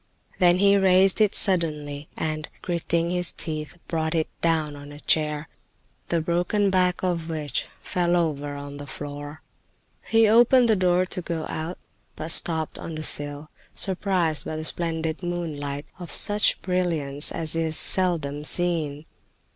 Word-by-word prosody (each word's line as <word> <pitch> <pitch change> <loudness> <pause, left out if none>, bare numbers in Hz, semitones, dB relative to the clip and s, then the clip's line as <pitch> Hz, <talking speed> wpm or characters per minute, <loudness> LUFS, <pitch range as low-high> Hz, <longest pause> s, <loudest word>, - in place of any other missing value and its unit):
Then 175 -1 +5
he 200 +1 +5
raised 190 +1 +4
it 210 -1 +3
suddenly 150 -6 +1
and, 155 -1 -3
gritting 170 -1 -1
his 180 -1 +2
teeth, 155 +1 -5
brought 160 0 -1
it 160 -1 +1
down 160 -3 0
on 145 0 -11
a 145 - -11
chair, 150 0 0 0.6
the 170 - 0
broken 180 +5 0
back 180 -1 +1
of 170 -3 -1
which 155 -3 -2 0.2
fell 175 -1 0
over 145 -4 -1
on 145 0 -8
the 145 0 -8
floor. 145 +2 -8 0.6
He 225 -1 +4
opened 240 +3 +5
the 220 - +4
door 180 -1 +2
to 180 - -4
go 165 -2 -4
out, 160 +3 -4 0.4
but 160 +1 -3
stopped 160 -1 +3
on 165 - -6
the 155 - -5
sill, 145 0 -1 0.2
surprised 185 -5 0
by 155 - -5
the 155 - -4
splendid 160 0 -2
moonlight, 150 -5 -4
of 175 -2 -8
such 210 0 +3
brilliance 165 -6 0
as 160 -1 +1
is 160 -1 +1
seldom 155 -6 +2
seen. 160 -3 0
165 Hz, 150 wpm, -24 LUFS, 150-180 Hz, 0.6 s, Then